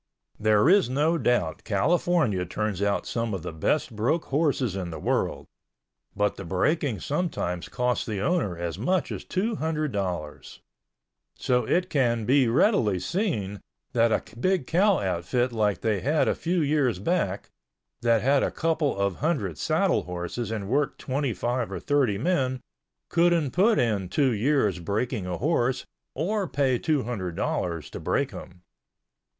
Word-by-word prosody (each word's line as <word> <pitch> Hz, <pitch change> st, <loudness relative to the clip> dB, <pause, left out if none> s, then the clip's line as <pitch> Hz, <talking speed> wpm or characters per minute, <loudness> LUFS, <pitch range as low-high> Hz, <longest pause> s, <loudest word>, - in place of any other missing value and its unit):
There 105 Hz, +2 st, +4 dB
is 190 Hz, -4 st, +5 dB
no 155 Hz, +6 st, +1 dB
doubt 120 Hz, -, 0 dB
California 120 Hz, -, +1 dB
turns 100 Hz, +2 st, -3 dB
out 100 Hz, -3 st, 0 dB
some 115 Hz, -3 st, -2 dB
of 90 Hz, -, -6 dB
the 90 Hz, -, -5 dB
best 115 Hz, -, 0 dB
broke 125 Hz, +10 st, 0 dB
horses 140 Hz, -, 0 dB
in 95 Hz, -3 st, -3 dB
the 80 Hz, -, -6 dB
world, -, -, -1 dB, 0.7 s
but 105 Hz, 0 st, 0 dB
the -, -, -6 dB
breaking 110 Hz, -, 0 dB
sometimes 140 Hz, -, -2 dB
costs 125 Hz, -1 st, 0 dB
the 105 Hz, -3 st, -2 dB
owner 105 Hz, -, 0 dB
as 85 Hz, +1 st, -4 dB
much 180 Hz, -, 0 dB
as -, -, -5 dB
two 210 Hz, +4 st, -1 dB
hundred 155 Hz, -2 st, -1 dB
dollars. 90 Hz, -7 st, -4 dB, 0.8 s
So 125 Hz, -2 st, +1 dB
it 180 Hz, +7 st, 0 dB
can 120 Hz, -6 st, +1 dB
be 130 Hz, +1 st, +4 dB
readily 115 Hz, -, +3 dB
seen 105 Hz, -, -2 dB, 0.3 s
that 115 Hz, -1 st, +3 dB
a -, -, +1 dB
big 185 Hz, +2 st, +1 dB
cow 195 Hz, +5 st, +3 dB
outfit 95 Hz, -, -1 dB
like 105 Hz, -5 st, 0 dB
they 110 Hz, -3 st, +1 dB
had 150 Hz, +6 st, +1 dB
a -, -, +3 dB
few 175 Hz, +1 st, -1 dB
years 145 Hz, -7 st, +1 dB
back, 100 Hz, -, -1 dB, 0.5 s
that 115 Hz, -2 st, +3 dB
had 140 Hz, +2 st, +3 dB
a -, -, +1 dB
couple 160 Hz, -6 st, 0 dB
of 100 Hz, -2 st, 0 dB
hundred 120 Hz, -, -1 dB
saddle -, -, +1 dB
horses 90 Hz, +6 st, -4 dB
and 105 Hz, -3 st, -4 dB
worked 140 Hz, +5 st, 0 dB
25 125 Hz, -3 st, -2 dB
or -, -, -3 dB
30 140 Hz, -8 st, +1 dB
men, 130 Hz, -, 0 dB, 0.5 s
couldn't 170 Hz, -4 st, +2 dB
put 210 Hz, -, +3 dB
in 105 Hz, -6 st, 0 dB
two 135 Hz, +4 st, +2 dB
years 110 Hz, -, +1 dB
breaking 105 Hz, +3 st, -2 dB
a 90 Hz, -1 st, -3 dB
horse 130 Hz, -4 st, 0 dB, 0.3 s
or 195 Hz, +6 st, -1 dB
pay 130 Hz, -4 st, +1 dB
two 155 Hz, -4 st, +1 dB
hundred 95 Hz, -8 st, -4 dB
dollars 85 Hz, -5 st, -2 dB
to -, -, -6 dB
break -, -, 0 dB
him. 90 Hz, 0 st, -11 dB
120 Hz, 155 wpm, -26 LUFS, 100-155 Hz, 0.8 s, is